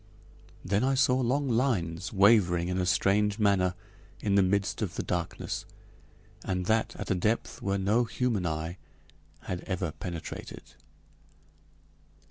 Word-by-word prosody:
Then 100 +4 +1
I 135 +1 +2
saw 130 -1 +3
long 135 +4 +1
lines 105 -9 0
wavering 95 -4 +4
in 90 0 -1
a 90 - 0
strange 100 +2 +2
manner 100 -4 +2 0.4
in 100 - 0
the 100 - +5
midst 95 +1 0
of - - -2
the - - -2
darkness, 85 -2 -3 0.8
and 90 -1 -2
that 110 +3 +1
at - - -4
a - - +5
depth 105 +5 -1
where 100 0 0
no 105 +5 +2
human 115 -6 -1
eye 80 +3 -4 0.6
had 90 -1 -4
ever 90 -4 -2
penetrated. 85 -1 -7
100 Hz, 135 wpm, -29 LUFS, 90-110 Hz, 0.8 s, the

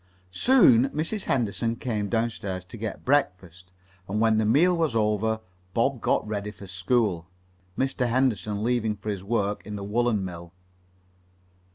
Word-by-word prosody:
Soon 135 - +5
Mrs. 165 +9 -3
Henderson 115 -2 0
came 110 -4 -3
downstairs 105 -5 -2
to 95 - -11
get 110 -1 -6
breakfast, 90 - -1 0.4
and 105 +2 -1
when 110 -1 +3
the 110 - +1
meal 165 +10 +4
was 160 -7 0
over 110 0 +1 0.3
Bob 120 +1 +1
got - - +1
ready 105 -1 -3
for 100 - -11
school, 95 -2 0 0.5
Mr. 130 -2 0
Henderson 110 -5 0
leaving 115 -3 0
for 105 +1 -7
his 95 -2 -5
work 105 -1 -1
in 105 - -7
the 100 - -5
woolen 110 -1 0
mill. 85 -1 -8
110 Hz, 150 wpm, -26 LUFS, 100-120 Hz, 0.5 s, Soon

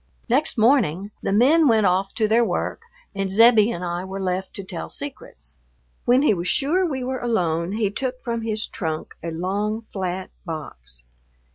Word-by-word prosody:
Next 270 +4 +2
morning... 215 - +2
the - - -1
men 285 +10 +5
went 220 -4 +4
off 190 +1 +2
to 220 -2 +2
their 230 +2 +4
work 230 - -2 0.3
and 195 -1 -2
Zebbie 225 +1 +6
and 180 -6 -4
I 175 +1 -3
were 190 +1 -6
left 185 0 -3
to 200 - -5
tell 80 - -6
secrets. - - -7 0.5
When 250 +3 +4
he 295 - +4
was 175 -1 -3
sure 305 - +2
we 265 -5 -3
were 260 +1 -3
alone 175 -6 0
he 210 -2 0
took 255 +3 -3
from 235 -2 -3
his 220 -1 -2
trunk 160 -5 -4
a 170 - -4
long, 200 +6 -2
flat 185 -3 -4
box. 120 - -8
205 Hz, 175 wpm, -23 LUFS, 180-235 Hz, 0.5 s, Zebbie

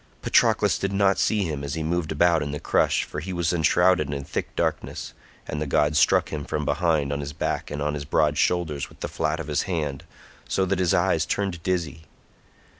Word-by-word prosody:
Patroclus - - +3
did 100 - -1
not 100 0 +2
see 105 -2 +2
him 75 -5 -3
as 70 +1 -3
he 80 - -3
moved 85 0 -1
about 85 +1 +3
in 75 - -3
the 75 +1 -4
crush, - - +2
for - - -6
he 90 +5 -6
was 85 -1 0
enshrouded 85 -1 +3
in 70 -1 -4
thick - - -5
darkness, - - -2 0.3
and 75 - -4
the 75 - -2
god 75 +2 +2
struck - - +4
him 75 -2 -4
from - - -3
behind 80 -5 +1
on 70 - -2
his 70 0 -5
back - - -2
and 75 0 -3
his 75 -1 -4
broad 75 +1 +1
shoulders 80 -4 0
with - - -19
the - - -2
flat 80 +2 -2
of 80 - -4
his 75 0 0
hand, 75 -5 -2 0.5
so 95 - +1
that 95 0 -1
his 90 -2 +2
eyes - - +2
turned 95 -5 -2
dizzy. 80 -3 -2
80 Hz, 210 wpm, -25 LUFS, 75-90 Hz, 0.5 s, struck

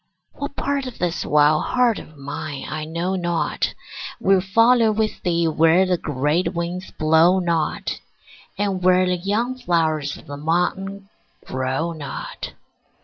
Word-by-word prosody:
What 285 0 -6
part 275 -1 -1
of 250 - -8
this 175 -1 -1
wild 150 +1 +4
heart 245 -3 +2
of 155 - -13
mine 145 0 -6
I 155 0 -4
know 170 +4 -2
not 175 -2 -1 0.4
Will 195 -1 +4
follow 230 +4 +4
with 215 0 -1
thee 170 -1 +1
where 165 +3 +4
the 185 -1 +2
great 150 +4 0
winds 175 +2 -3
blow 160 +4 +4
not, 170 -4 -1 0.6
And 195 -2 -1
where 185 0 +4
the 180 0 +1
young 225 +8 -1
flowers 155 - 0
of - - -15
the 145 -2 -7
mountain 190 +5 -1 0.4
grow 130 +6 -2
not. 150 -5 -6
175 Hz, 145 wpm, -22 LUFS, 155-195 Hz, 0.6 s, wild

